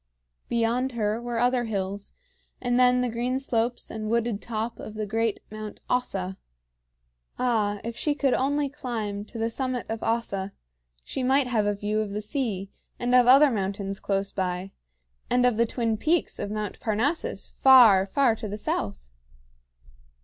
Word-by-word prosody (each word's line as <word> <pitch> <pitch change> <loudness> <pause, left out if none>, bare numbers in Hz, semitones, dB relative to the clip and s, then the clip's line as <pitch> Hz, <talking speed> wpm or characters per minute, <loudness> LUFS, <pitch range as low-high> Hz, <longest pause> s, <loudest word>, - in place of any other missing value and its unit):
Beyond 240 +3 +1
her 220 0 -1
were 240 -1 -3
other 245 +1 +2
hills, 200 -2 -4 0.5
and 245 0 +1
then 250 0 +5
the 250 - 0
green 245 +3 -1
slopes 240 -2 -1
and 215 -1 -4
wooded 230 -2 0
top 225 0 -4
of 215 - -8
great 225 0 -1
Mount 215 -1 -7
Ossa. 190 -7 -1 1.0
Ah, 215 -5 +1
if 230 0 -5
she 290 +4 0
could 275 -3 +1
only 285 +2 +1
climb 230 -8 -4
to 230 - -10
the 225 +1 -1
summit 255 -1 -2
of 225 0 -3
Ossa, 200 -4 -2 0.5
she - - -4
might 265 +2 +3
have 225 -4 +1
a 205 - +1
view 210 +1 -1
of 210 -2 -2
the 210 - -2
sea, 210 -5 -3 0.3
and 245 +1 -1
of 250 -1 +6
other 275 +3 +7
mountains 195 -2 -3
close 195 0 -1
by, 185 0 -3 0.6
and 250 0 +3
of 245 -2 +3
the 230 +1 +2
twin 225 -2 -1
peaks 325 +9 +1
of 205 - -3
Mount 210 -1 -4
Parnassus, 235 +9 -1
far, 230 -8 +7
far 245 +2 +3
to 215 - -5
the 205 +1 -5
south! 100 - -3
230 Hz, 165 wpm, -26 LUFS, 205-250 Hz, 1.0 s, other